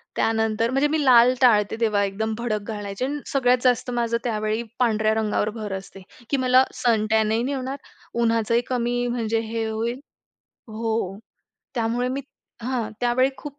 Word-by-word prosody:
त्यानंतर 225 0 +1
म्हणजे 270 +3 +2
मी 305 0 0
लाल 250 -1 +6
टाळते 215 -5 +4
तेव्हा 210 -3 +2
एकदम 220 +3 -2
भडक 215 -3 -3
घालायचे 205 +2 -4
आणि 290 +2 -3
सगळ्यात 250 -2 +3
जास्त 250 0 +2
माझं 235 -1 0
त्यावेळी 215 -1 -1 0.2
पांढऱ्या 220 -3 +2
रंगावर 215 -1 0
भर 210 -3 -5
असते 195 0 -12 0.3
की 280 - +1
मला 255 0 +5
सनटॅनही 220 -2 +1
नाही 275 +3 -1
होणार. 265 +1 -4 0.4
उन्हाचंही 230 0 +2
कमी 245 -1 0
म्हणजे 230 -2 -1
हे 225 0 -2
होईल 230 +3 -2 0.7
हो. 220 -3 -2 0.6
त्यामुळे 240 +1 0
मी 265 +2 -2 0.4
हां. 240 -2 -2
त्यावेळी 245 +2 +2
खूप 290 -1 -9
230 Hz, 150 wpm, -23 LUFS, 220-250 Hz, 0.7 s, लाल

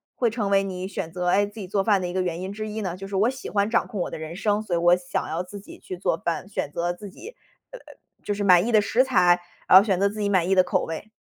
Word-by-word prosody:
会 240 - +1
成 215 -3 -2
为 195 0 +3
你 185 -1 -5
选 175 -4 -5
择， 180 +1 -3
诶， 200 +3 +3
自 205 +2 -11
己 195 - -6
做 195 +1 0
饭 200 -2 +2
的 180 - -2
一 175 - -5
个 185 - 0
原 175 -2 -2
因 190 +1 -5
之 215 +1 -5
一 215 +1 -5
呢， 185 -4 -3
就 195 +1 -8
是 195 - -6
我 210 +5 +3
喜 260 0 -7
欢 200 0 +1
掌 235 - +2
控 210 - -6
我 - - -2
的 - - -6
人 160 +1 -7
生， 210 +2 0
所 195 - -5
以 - - +1
我 175 +1 +5
想 180 0 -4
要 165 +3 -3
自 200 +3 -10
己 200 - -13
去 185 - -8
做 175 -2 0
饭， 170 +2 -3
选 195 -7 -4
择 175 +3 -2
自 200 +3 -10
己 405 - -12 0.4
呃 - - -9
呃， - - -24 0.4
就 205 - -2
是 205 0 -3
满 180 -1 +6
意 240 - -1
的 220 - +5
食 235 +5 +2
材， 180 -8 +3 0.3
然 185 - +9
后 190 - +8
选 195 -4 0
择 200 - +3
自 210 +1 -5
己 205 - 0
满 185 -3 +2
意 195 - +3
的 185 - +6
口 - - 0
味。 165 +6 -7
195 Hz, 340 characters per minute, -24 LUFS, 180-210 Hz, 0.4 s, 然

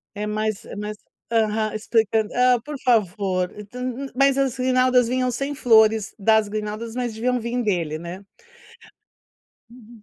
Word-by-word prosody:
É 210 +1 -3
mais 215 0 -2
é - - -9
mais 210 +1 -5 0.3
Aham, 220 -1 +1
explicando 220 0 +1
Hã, 250 -1 +4
por 295 +3 -7
favor, 195 -6 +1 0.2
tu 250 - -8
nu 255 +2 -4
nu - - -13
mas 275 +1 +3
as 270 -3 +1
grinaldas 255 -1 +3
vinham 255 0 0
sem 275 +4 -3
flores. 220 -4 +3
Das 220 +1 +3
grinaldas, 215 +2 -5
mas 245 -2 -3
deviam 250 +3 0
vir 235 +2 -2
dele, 170 -8 -1
né? 170 +3 -8 1.5
Uhum. 235 -2 -16
225 Hz, 155 wpm, -23 LUFS, 210-250 Hz, 1.5 s, Hã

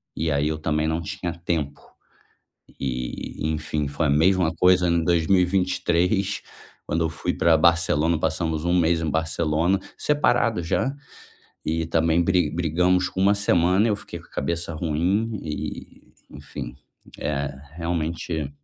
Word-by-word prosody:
E 80 -1 -1
aí, 70 +1 +1
eu 80 - -1
também 75 0 0
não 80 +1 -1
tinha 85 +1 -4
tempo. 80 -4 -3 1.0
E 65 -2 -4 0.2
enfim 75 -1 -2
foi 75 +3 -1
a - - +2
mesma 85 +3 +3
coisa 90 -1 +4
em 85 0 +2
2023 90 +2 +1 0.4
quando 80 +2 0
eu - - +1
fui 80 - -2
pra 80 -1 +4
Barcelona, 85 -1 +3
passamos 80 0 -1
1 85 +1 +2
mês 85 0 +2
em 80 - -2
Barcelona, 80 +3 +1 0.2
separado 120 -9 +2
já. 130 +11 0 0.7
E 80 0 -1
também 80 +1 +2
bri 90 -4 +2
brigamos 90 +3 +1
1 100 +2 +4
semana 95 +1 +3
eu 105 - +1
fiquei - - -9
com - - -18
a - - -31
cabeça 85 +3 -3
ruim 90 +8 0
e 75 -1 -7 0.2
enfim, - - -8 0.4
eh, 70 -1 -2 0.2
realmente 85 -2 -2
85 Hz, 140 wpm, -24 LUFS, 80-90 Hz, 1.0 s, coisa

